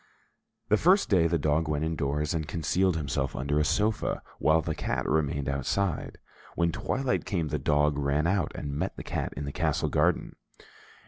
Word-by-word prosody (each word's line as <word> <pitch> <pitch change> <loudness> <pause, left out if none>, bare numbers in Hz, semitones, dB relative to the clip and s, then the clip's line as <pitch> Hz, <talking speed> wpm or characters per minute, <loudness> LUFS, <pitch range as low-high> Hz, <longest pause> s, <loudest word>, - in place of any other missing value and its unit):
The 105 - +5
first 185 - +4
day 85 -4 +5
the 85 0 +1
dog 75 +1 +1
went 75 +1 -1
indoors, 75 -1 -1
and 80 -2 -2
concealed 85 +3 +1
himself 70 -3 -2
under 75 +2 0
a - - +3
sofa, 105 +8 0 0.2
while 80 +1 +4
the - - -2
cat - - -2
remained 70 -3 0
outside. 75 +6 -1 0.4
When 85 0 +2
twilight 130 +10 -1
came, 85 -6 -2
the 75 - -1
dog 75 +1 +2
ran 70 +2 +1
out 90 -2 +1
and 70 -1 -4
met 90 +6 -3
the - - -6
cat - - -3
in 70 - -3
the 70 - -4
castle - - 0
garden. - - +1
80 Hz, 180 wpm, -28 LUFS, 75-85 Hz, 0.4 s, The